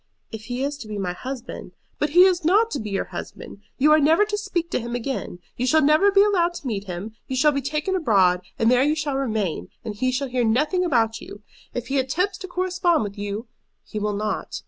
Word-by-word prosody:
"If 220 -1 -8
he 245 +3 -3
is 285 +1 -3
to 220 - -8
be 210 -1 -5
my 185 -3 -2
husband 255 +5 -7
" - - -43
"But 295 - +1
he 350 +5 +7
is 370 -2 +3
not 420 +8 +3
to - - -2
be 215 - -5
your 195 - -1
husband. - - -8 0.2
You 295 +3 +4
are 310 - +6
never 320 +8 +4
to 420 0 -2
speak 390 -5 -3
to - - 0
him 235 0 -4
again. 245 -5 -4 0.2
You 250 - -1
shall 315 +3 +4
never 310 +8 +5
be 395 0 +5
allowed 355 -4 +2
to - - -9
meet 205 -5 -3
him; 190 +4 -6
you 260 - -3
shall 295 +4 +4
be 280 -1 -1
taken 305 +7 -2
abroad, 195 - +3 0.2
and 225 +1 +3
there 250 0 +4
you 295 +3 +2
shall 300 -3 -2
remain, 215 - -2 0.2
and 215 - -3
he 255 +5 0
shall 265 +1 -2
hear 250 0 0
nothing 300 - +2
about 225 -9 +1
you. 205 +1 -11 0.3
If 245 -1 -4
he 275 0 +1
attempts 360 +10 -1
to 375 - -7
correspond 360 - +1
with 200 -1 -6
you 205 +2 -4 0.2
" - - -51
"He 215 - -3
will 210 0 -1
not." 210 +1 -3
265 Hz, 245 wpm, -23 LUFS, 220-340 Hz, 0.3 s, he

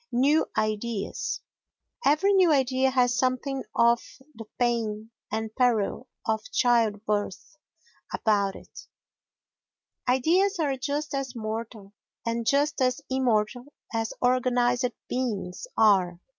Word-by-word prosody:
New 280 +6 +3
Ideas 215 0 -2 0.6
Every 380 +8 +3
new 370 -4 +5
idea 265 -2 +2
has 250 -2 +2
something 260 +1 -1
of 235 0 +4 0.3
the 225 -2 -9
pain 225 -3 -1 0.2
and 220 0 -3
peril 245 -1 +1 0.2
of 220 -1 0
childbirth 215 -2 0 0.6
about 200 -3 +1
it; - - -13 1.2
ideas 350 +11 +3
are 290 -5 0
just 285 +3 -3
as 270 -2 -3
mortal 220 -2 -6 0.3
and 230 0 -2
just 290 +1 +2
as 255 +2 +1
immortal 245 -2 +1 0.3
as 225 -1 -1
organised 245 0 +2 0.2
beings 225 - -3
are. 185 -5 +4
245 Hz, 105 wpm, -26 LUFS, 220-265 Hz, 1.2 s, new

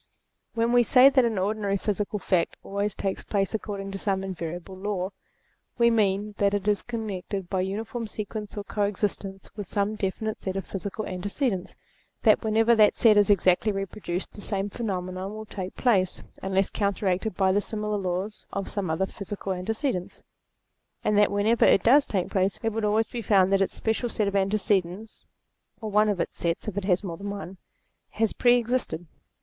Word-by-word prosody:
When 230 +1 +2
we 245 0 +6
say 255 +3 +7
that 265 -3 +4
an 225 -3 0
ordinary 200 +1 0
physical 210 +1 -2
fact 185 -4 0
always 200 +1 -2
takes 195 -1 -3
place 195 -1 -1
according 200 -2 -4
to 195 - -4
some 195 -1 0
invariable 175 0 -5
law, 190 -1 -3 0.7
we 235 -1 +5
mean 210 -1 +1
that 200 0 +3
it 200 0 -3
is 205 -2 +2
connected 200 -5 -5
by 190 -2 +1
uniform 220 +4 -3
sequence 210 0 -6
or 205 - -3
coexist 205 0 -1
ence 195 0 -10
with 205 -3 -5
some 200 +2 0
definite 215 +1 -3
set 190 -1 -3
of 195 - -3
physical 200 +2 -5
antecedents; 195 +2 -2 0.5
that - - +5
whenever 225 +2 +4
that 215 -2 +5
set 220 -3 +6
is 205 0 +4
exactly 195 +1 +4
reproduced 195 -2 -4
the 205 - -11
same 200 0 -2
phenomenon 190 -2 -4
will 215 0 -7
take 190 -3 -6
place, 195 -8 +2 0.2
unless 190 0 +1
counteracted 200 0 0
by 190 0 +3
the 205 +2 +2
similar 210 -1 -2
laws 190 +3 -3
of 200 -1 -3
some 200 -5 -2
other 160 +4 +1
physical 195 0 -5
antecedents; 195 - -3 0.8
and 210 - +2
that 205 0 +5
whenever 210 +3 +2
it 195 - +5
does 275 +5 +6
take 190 -4 -1
place, 190 0 +1
it 225 - +2
would 220 -1 -1
always 215 +2 +2
be 240 - -4
found 195 -2 +4
that 195 - +4
its 195 - 0
special 225 +2 -1
set 215 -2 0
of 200 - -2
antecedents 195 0 0 0.5
(or 220 -2 -5
one 210 +1 +4
of 200 -3 0
its - - -2
sets 170 +5 -2
if 210 - -3
it 200 -2 -2
has 185 0 +2
more 170 -4 -5
than 200 +2 -5
one) 195 -2 -6 0.5
has 225 0 0
pre 245 0 +5
existed. 235 -8 -1
200 Hz, 185 wpm, -26 LUFS, 190-215 Hz, 0.8 s, say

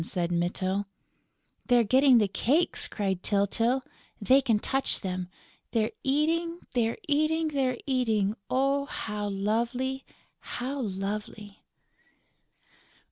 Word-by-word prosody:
said 175 0 -1
Mytyl. 185 +3 -1 0.8
"They're 245 -2 +5
getting 260 +3 +5
the 210 -3 +3
cakes!" 285 - +1
cried 190 -3 -2
Tyltyl. 225 +7 +1 0.4
"They 260 +6 +4
can 230 -5 +2
touch 270 +5 +1
them!... 185 -1 -3 0.5
They're 220 -2 +1
eating, 330 +5 0
they're 230 -2 +1
eating, 310 +2 +1
they're 265 -4 0
eating!... 225 -7 +1 0.2
Oh, 275 +2 +1
how 210 -6 -4
lovely, 235 +7 -1 0.4
how 265 +3 -5
lovely!..." 205 0 -5
235 Hz, 105 wpm, -28 LUFS, 205-270 Hz, 0.8 s, They're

